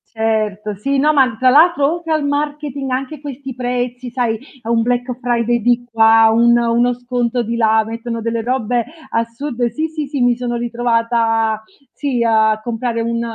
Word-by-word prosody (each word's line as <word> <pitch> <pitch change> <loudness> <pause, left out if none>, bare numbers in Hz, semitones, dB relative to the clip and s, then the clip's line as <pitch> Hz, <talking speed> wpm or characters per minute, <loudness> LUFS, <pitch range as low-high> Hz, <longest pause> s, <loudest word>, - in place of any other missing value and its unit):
Certo 215 -2 -1
sì 275 +8 -1
no, 300 +3 +3
ma 260 -6 +2
tra 255 - +4
l'altro 300 +1 +4
oltre 340 -1 -5
al 310 -2 +1
marketing 285 -1 -3
anche 270 +3 -3
questi 270 -2 -7
prezzi 245 0 -3
sai, 235 -2 -1 0.3
a 225 - -6
un 230 -1 +2
Black 245 +2 -1
Friday 240 -1 0
di 245 +2 +1
qua, 225 -1 +5
un 235 +1 +4
uno 235 +1 +2
sconto 245 0 -2
di 230 +1 -3
là, 220 -1 +3
mettono 230 +1 -5
delle 230 0 -2
robe 245 0 0 0.3
assurde. 235 +2 -2
Sì, 310 +7 -2
sì, 310 -2 -5
sì 280 0 -4
mi 245 -1 +3
sono 240 0 -3
ritrovata, 230 -2 0 0.3
sì 270 -5 -2
a 220 -1 +3
comprare 235 +1 -3
un 230 0 -1
240 Hz, 170 wpm, -17 LUFS, 230-260 Hz, 0.3 s, qua